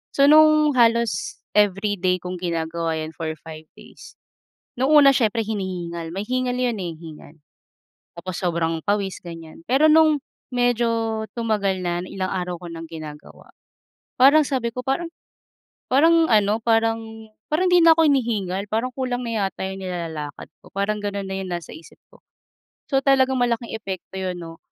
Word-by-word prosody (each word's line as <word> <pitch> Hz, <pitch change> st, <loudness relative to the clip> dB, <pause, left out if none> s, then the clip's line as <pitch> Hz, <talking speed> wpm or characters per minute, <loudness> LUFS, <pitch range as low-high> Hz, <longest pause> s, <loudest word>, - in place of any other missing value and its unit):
So 275 Hz, -, +4 dB
nung 305 Hz, 0 st, +6 dB
halos 230 Hz, -6 st, +2 dB, 0.2 s
everyday 195 Hz, -2 st, +2 dB
kung 180 Hz, 0 st, -4 dB
ginagawa 165 Hz, -1 st, -2 dB
yun 155 Hz, 0 st, -5 dB
for 165 Hz, -, -4 dB, 0.2 s
5 160 Hz, -1 st, -10 dB
days, -, -, -15 dB, 0.6 s
nung 265 Hz, -, +2 dB
una 290 Hz, -2 st, +8 dB
siyempre 225 Hz, -2 st, +1 dB
hinihingal, 175 Hz, -5 st, -4 dB
may 195 Hz, -, -2 dB
hingal 255 Hz, 0 st, -1 dB
'yon, 245 Hz, -3 st, 0 dB
eh, 175 Hz, -2 st, -4 dB
hingal. 155 Hz, -1 st, -12 dB, 0.8 s
Tapos 185 Hz, +1 st, -6 dB
sobrang 165 Hz, -2 st, -1 dB
pawis 200 Hz, -2 st, -1 dB
ganiyan, 165 Hz, -2 st, -10 dB
pero 275 Hz, +5 st, +5 dB
nung 310 Hz, -2 st, +5 dB, 0.3 s
medyo 230 Hz, -2 st, 0 dB
tumagal 210 Hz, -5 st, 0 dB
na 175 Hz, 0 st, -1 dB
ilang 185 Hz, 0 st, -4 dB
araw 180 Hz, -1 st, -3 dB
ko 175 Hz, -, -8 dB
ng 165 Hz, 0 st, -7 dB
ginagawa, 155 Hz, -2 st, -11 dB, 0.7 s
parang 280 Hz, +5 st, +6 dB
sabi 255 Hz, -4 st, -1 dB
ko 250 Hz, -, -4 dB
parang 330 Hz, +6 st, -1 dB, 0.8 s
parang 325 Hz, +4 st, +5 dB
ano, 210 Hz, 0 st, +3 dB
parang 225 Hz, 0 st, +2 dB, 0.5 s
parang 345 Hz, +5 st, +2 dB
hindi 355 Hz, -1 st, +6 dB
na 330 Hz, -, +9 dB
ko 325 Hz, -, +5 dB
hinihingal 215 Hz, -9 st, 0 dB
parang 225 Hz, +4 st, 0 dB
kulang 255 Hz, -2 st, -2 dB
na 225 Hz, -4 st, -1 dB
yata 190 Hz, -, -6 dB
yung 190 Hz, -, -6 dB
nilalakad 165 Hz, -5 st, -6 dB
ko -, -, -16 dB
parang 200 Hz, +2 st, -1 dB
ganun 200 Hz, -1 st, -3 dB
na 190 Hz, -, -3 dB
yung 190 Hz, -1 st, -6 dB
nasa 175 Hz, -1 st, -5 dB
isip 160 Hz, +1 st, -15 dB
ko. -, -, -20 dB, 0.7 s
So 270 Hz, -, +3 dB
talagang 265 Hz, -1 st, +3 dB
malaking 235 Hz, -1 st, -1 dB
epekto 190 Hz, -4 st, -7 dB
yun 185 Hz, -1 st, -3 dB
no, 165 Hz, -1 st, -9 dB
205 Hz, 160 wpm, -22 LUFS, 175-250 Hz, 0.8 s, na